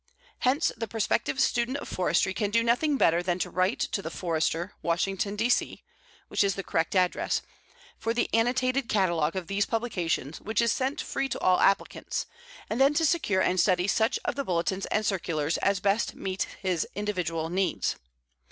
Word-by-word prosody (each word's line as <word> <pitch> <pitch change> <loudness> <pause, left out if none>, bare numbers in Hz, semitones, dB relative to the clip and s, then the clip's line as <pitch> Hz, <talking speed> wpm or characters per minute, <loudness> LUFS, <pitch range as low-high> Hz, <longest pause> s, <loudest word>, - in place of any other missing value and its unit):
Hence, 270 +5 +2
the 225 0 -4
prospective 225 +4 -1
student 240 +3 +1
of - - -7
forestry 185 +1 +1
can 205 +1 -1
do 230 +2 +2
nothing 270 +5 +2
better 170 -7 +3
than 175 -1 -1
to - - -3
write 185 +5 +1
to 200 - -1
The 160 - -5
Forester, 170 +2 -1
Washington, 195 +4 -1
D. 220 +3 +1
C. 245 - 0 0.4
(which - - +1
is 195 -2 +1
the 195 - -4
correct 165 +2 -1
address), 180 -1 +1 0.6
for 225 - -1
the 235 - +1
annotated 255 +3 +1
catalogue 170 -6 +1
of 185 -2 -3
these 200 +3 0
publications 180 - -2
which 220 0 -2
is 235 -1 +3
sent 265 +4 -1
free 270 0 -2
to - - -3
all 185 0 +3
applicants, 195 0 +1 0.4
and 230 +4 -1
then 280 +2 +5
to 325 - +3
secure 250 - +2
and 185 0 +2
study 180 0 +3
such 220 +2 +2
of - - 0
the 280 - -2
bulletins 185 -1 -1
and 215 - 0
circulars 165 -5 -1
as 200 -1 +1
best 200 +4 +1
meet 190 0 -3 0.2
his 180 -4 0
individual 180 -6 -2
needs. 190 +1 0
195 Hz, 180 wpm, -27 LUFS, 180-230 Hz, 0.6 s, then